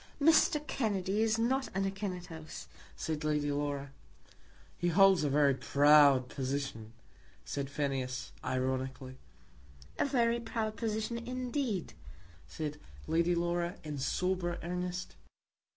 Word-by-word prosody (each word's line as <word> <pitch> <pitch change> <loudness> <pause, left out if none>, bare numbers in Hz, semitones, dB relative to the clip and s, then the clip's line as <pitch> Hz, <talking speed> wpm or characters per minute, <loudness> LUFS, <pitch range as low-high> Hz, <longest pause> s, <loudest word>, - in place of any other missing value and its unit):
"Mr. 300 0 +4
Kennedy 205 -6 0
is 220 0 +2
not 260 +4 +1
an 195 0 +1
Akinetos," 180 -5 -5 0.3
said 155 -1 -3
Lady 150 -1 0
Laura. 145 -1 -2 0.9
"He 175 - 0
holds 190 0 +5
a 145 - +1
very 140 0 +4
proud 140 -1 +5
position," 130 -5 -4 0.5
said 140 -1 -3
Phineas, 135 -3 -2
ironically. 130 0 -2 0.8
"A - - +3
very 235 -4 +2
proud 225 -2 -3
position 220 +1 -2
indeed," 250 - -3 0.5
said 150 - -5 0.3
Lady 170 +2 +2
Laura, 175 +1 -1
in 150 -2 -5
sober 180 +4 -1
earnest. 180 +1 -4
170 Hz, 110 wpm, -32 LUFS, 140-215 Hz, 0.9 s, holds